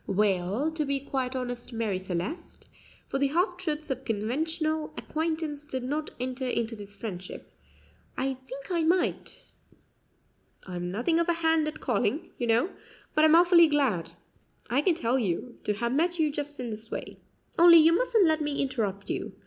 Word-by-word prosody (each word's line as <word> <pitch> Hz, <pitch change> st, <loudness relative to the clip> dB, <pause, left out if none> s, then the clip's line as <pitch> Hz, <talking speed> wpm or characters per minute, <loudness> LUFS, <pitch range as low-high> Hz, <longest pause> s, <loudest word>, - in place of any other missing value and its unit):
"Well, 200 Hz, -, +1 dB
to 315 Hz, -1 st, -1 dB
be 280 Hz, -1 st, -1 dB
quite 265 Hz, -1 st, -3 dB
honest, 245 Hz, -1 st, -4 dB
Marie 225 Hz, -5 st, -1 dB
Celeste," 185 Hz, -, -5 dB, 0.4 s
for 270 Hz, -, -2 dB
the 280 Hz, -, +3 dB
half 355 Hz, +5 st, +1 dB
truths 310 Hz, -5 st, -3 dB
of 265 Hz, 0 st, -3 dB
conventional 310 Hz, +8 st, -1 dB
acquaintance 315 Hz, -2 st, -3 dB
did 260 Hz, -3 st, -4 dB
not 300 Hz, +4 st, -2 dB
enter 255 Hz, +1 st, -3 dB
into 230 Hz, -2 st, -1 dB
this 205 Hz, -1 st, -11 dB
friendship, 185 Hz, -5 st, -7 dB, 0.7 s
"I 265 Hz, +1 st, 0 dB
think 275 Hz, +5 st, -8 dB
I 340 Hz, -2 st, +1 dB
might; 345 Hz, +3 st, -1 dB, 1.1 s
I'm 175 Hz, -1 st, -4 dB
nothing 245 Hz, -, +1 dB
of 340 Hz, +1 st, +1 dB
a -, -, +4 dB
hand 320 Hz, -1 st, +3 dB
at 305 Hz, 0 st, -6 dB
calling, 245 Hz, +4 st, 0 dB
you 240 Hz, -, -1 dB
know, 235 Hz, +11 st, +2 dB, 0.4 s
but 310 Hz, -, +3 dB
I'm 315 Hz, +1 st, +6 dB
awfully 345 Hz, -1 st, +7 dB
glad, 255 Hz, -, +1 dB, 0.6 s
I 265 Hz, +4 st, +3 dB
can 340 Hz, +2 st, +2 dB
tell 255 Hz, -3 st, +1 dB
you, 225 Hz, +3 st, -3 dB
to 210 Hz, -, +1 dB
have 235 Hz, +3 st, -1 dB
met 340 Hz, +5 st, +1 dB
you 310 Hz, -2 st, +2 dB
just 290 Hz, 0 st, -5 dB
in 245 Hz, -2 st, -4 dB
this 220 Hz, +1 st, -7 dB
way, -, -, -6 dB, 0.4 s
only 340 Hz, 0 st, +9 dB
you 325 Hz, +1 st, +7 dB
mustn't 450 Hz, -1 st, +3 dB
let 315 Hz, -1 st, +2 dB
me 295 Hz, -1 st, -1 dB
interrupt 210 Hz, -7 st, -2 dB
you. -, -, -4 dB
275 Hz, 175 wpm, -28 LUFS, 230-315 Hz, 1.1 s, only